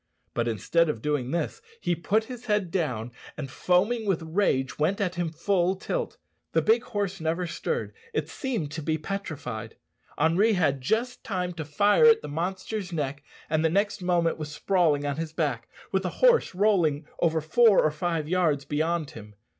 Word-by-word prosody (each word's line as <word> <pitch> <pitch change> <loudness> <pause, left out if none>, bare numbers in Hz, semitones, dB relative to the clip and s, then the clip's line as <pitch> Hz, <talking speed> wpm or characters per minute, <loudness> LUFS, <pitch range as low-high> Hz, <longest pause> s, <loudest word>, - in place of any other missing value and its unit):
But 120 0 0
instead 155 - +1
of 135 - -2
doing 145 -4 0
this 170 - -2 0.2
he 175 - 0
put 205 +6 +1
his 245 +1 -9
head 210 -5 0
down, 125 - -2 0.3
and, 135 -4 -5
foaming 205 - +1
with 175 -4 +1
rage, 160 -7 0
went 170 +7 +1
at 185 -3 0
him 175 -2 -2
full 175 +3 +1
tilt. 480 - -3 0.4
The - - +4
big 445 +1 +4
horse 195 -3 -3
never 165 +3 -1
stirred; 470 - -3 0.2
it 445 - -1
seemed 230 - -3
to 160 +1 -5
be 155 +1 0
petrified, 150 - -5 0.4
Henri 175 +9 +3
had 145 -8 +1
just 235 - -1
time 180 -3 -2
to 160 -2 -5
fire 205 - +4
at 460 -1 +6
the - - -5
monster's 185 +5 -3
neck, 145 -3 -3 0.3
and 155 0 +1
the 160 - +4
next 200 +3 0
moment 175 -2 +1
was 150 -1 -5
sprawling 155 -3 +1
on 145 0 -2
his 160 -1 -4
back, 140 -8 -2 0.2
with 190 - +1
the 185 - -2
horse 480 - +3
rolling 175 -7 +2
over 165 -1 +2
four 205 +7 +5
or 155 - +3
five 160 0 -2
yards 160 -5 +1
beyond 155 +1 -1
him. 105 -2 -11
170 Hz, 180 wpm, -27 LUFS, 150-200 Hz, 0.4 s, at